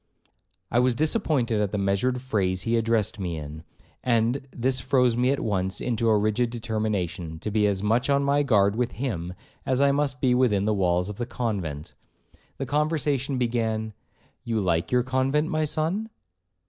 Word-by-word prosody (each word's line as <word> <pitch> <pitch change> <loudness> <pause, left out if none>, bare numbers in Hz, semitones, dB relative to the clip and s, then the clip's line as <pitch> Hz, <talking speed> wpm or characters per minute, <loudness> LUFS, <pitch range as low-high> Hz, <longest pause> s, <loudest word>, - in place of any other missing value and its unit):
'I 120 - +3
was 125 -1 +2
disappointed 145 - +1
at 105 - 0
the 105 - -2
measured 100 +6 0
phrase 95 -7 0
he 115 0 +1
addressed 115 -1 +1
me 85 -4 -3
in, 75 +1 -7 0.4
and 120 +3 +1
this 130 +1 0
froze 125 -2 +2
me 125 +2 +2
at 140 - +1
once 95 -3 -1
into 115 -2 0
a 110 - +4
rigid 110 +3 +1
determination, 105 -8 -3
to 105 +6 -5
be 105 0 +3
as 100 -1 -1
much 115 +6 +1
on 140 0 +3
my 140 +1 +2
guard 105 -7 +3
with 120 +1 -1
him, 90 -9 -4 0.3
as 130 -2 0
I 140 0 +4
must 140 -2 0
be 125 -2 +3
within 115 -6 +2
the 110 - +2
walls 90 -2 +1
of 105 -1 -6
the 120 - -3
convent. 90 -13 -4 0.6
The 135 - -3
conversation 145 -2 0
began, 110 -3 -1 0.5
'You 115 -3 -1
like 85 -4 0
your 125 -1 +3
convent, 130 +4 0
my 155 0 0
son?' 165 +9 -1
115 Hz, 175 wpm, -25 LUFS, 100-130 Hz, 0.6 s, a